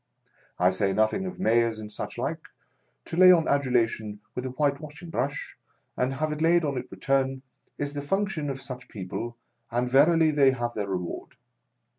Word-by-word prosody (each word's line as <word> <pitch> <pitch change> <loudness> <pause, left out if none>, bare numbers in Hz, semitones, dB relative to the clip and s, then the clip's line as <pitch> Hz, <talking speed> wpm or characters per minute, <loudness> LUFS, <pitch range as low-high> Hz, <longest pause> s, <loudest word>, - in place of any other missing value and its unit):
I 90 +1 +4
say 95 +1 +1
nothing 110 - +1
of 185 0 -7
Mayors 115 -8 +2
and 105 -1 -8
such - - -6
like; - - -3 0.3
— - - -45
to - - -6
lay 185 +1 +9
on 165 -3 +4
adulation 115 -6 +1
with 125 +1 -3
a - - -4
whitewashing 145 +4 -2
brush 140 -3 -3 0.4
and 130 +1 0
have 155 +3 -1
it 150 0 -4
laid 170 0 +4
on 140 -2 -1
in 125 - -4
return, 135 -1 0 0.3
is 145 0 -3
the 145 - -3
function 190 -1 -1
of 135 -1 -4
such 125 -2 -8
people, 110 +4 -6 0.3
and 120 +1 0
verily 155 +5 +5
they 140 -3 +4
have 120 -2 -3
their 100 -3 -3
reward. 90 -2 -4
135 Hz, 180 wpm, -27 LUFS, 115-155 Hz, 0.4 s, lay